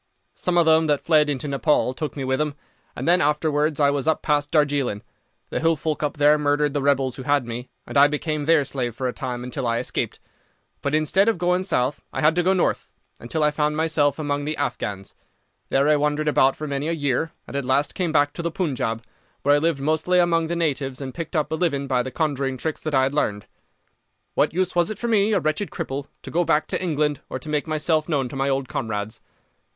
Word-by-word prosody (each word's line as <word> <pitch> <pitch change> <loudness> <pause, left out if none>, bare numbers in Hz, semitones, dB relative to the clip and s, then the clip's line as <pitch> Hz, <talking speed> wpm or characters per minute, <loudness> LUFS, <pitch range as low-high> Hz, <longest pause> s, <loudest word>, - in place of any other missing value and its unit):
Some 180 -1 -1
of 170 - +5
them 160 0 +4
that 145 -2 +1
fled 155 -2 +4
into 145 0 -2
Nepaul 140 -2 +1
took 150 +3 -5
me 135 - -3
with 130 0 0
them, 150 -2 -1 0.4
and - - -4
then 175 +1 +5
afterwards 150 0 +1
I 140 -1 +4
was 140 0 -2
up 160 - +1
past 145 -1 +1
Darjeeling. 140 -8 +1 0.5
The - - -1
hill 165 0 +3
folk 155 +1 -3
up 150 -1 -2
there 150 +1 +5
murdered 145 0 +1
the 145 - 0
rebels 135 -2 +1
who - - -6
had 145 -1 +1
me, 120 +2 -6 0.2
and - - -9
I 140 +1 +7
became 150 0 -2
their 160 -2 +4
slave 125 -4 -3
for 130 +2 -2
a 125 - -2
time 125 -1 -4
until 125 0 -4
I 115 0 +1
escaped; - - -3 0.6
but 140 +1 0
instead 185 +7 +3
of 225 - 0
going 180 +1 +1
south 145 -7 -1
I - - -3
had 155 +1 +5
to 175 - +2
go 185 +2 +2
north, 185 - 0 0.3
until 150 +7 -2
I 150 - +3
found 150 0 0
myself 155 -3 +1
among 145 -2 -2
the 155 +1 -2
Afghans. 100 -8 -3 0.6
There 135 +2 +2
I 150 0 +4
wandered 150 +1 0
about 135 -2 +4
for 155 - -5
many 140 +1 -2
a 165 - 0
year, 145 0 -1
and - - -9
at 140 - -1
last 135 +3 +1
came 180 -3 -1
back 145 -2 +2
to - - -5
the 170 - -1
Punjab, 130 - -2 0.4
where 145 - +4
I 145 - +4
lived 160 -2 0
mostly 160 +5 +1
among 170 -2 +3
the 170 - -2
natives 140 -5 -1
and 135 -2 -6
picked 165 0 -6
up 155 -1 0
a - - +1
living 155 -5 0
by 130 -2 +1
the 130 - -4
conjuring 135 -2 -1
tricks 160 +3 -3
that 155 -2 -2
I 130 - +4
had 135 +1 0
learned. 105 -8 -1 0.9
What - - +2
use 185 +2 -1
was 175 -1 +3
it 215 - -4
for 235 - -3
me, 215 -2 +3
a - - +3
wretched 155 +6 -1
cripple, 140 -5 -5 0.2
to - - -8
go 175 +2 +2
back 155 -2 +2
to - - -1
England 150 -5 0
or - - -3
to 140 +4 -9
make 150 +1 -1
myself 155 0 0
known 140 -5 +1
to 135 - -8
my 135 +1 0
old 135 -1 -1
comrades? 110 0 -4
150 Hz, 235 wpm, -23 LUFS, 135-160 Hz, 0.9 s, I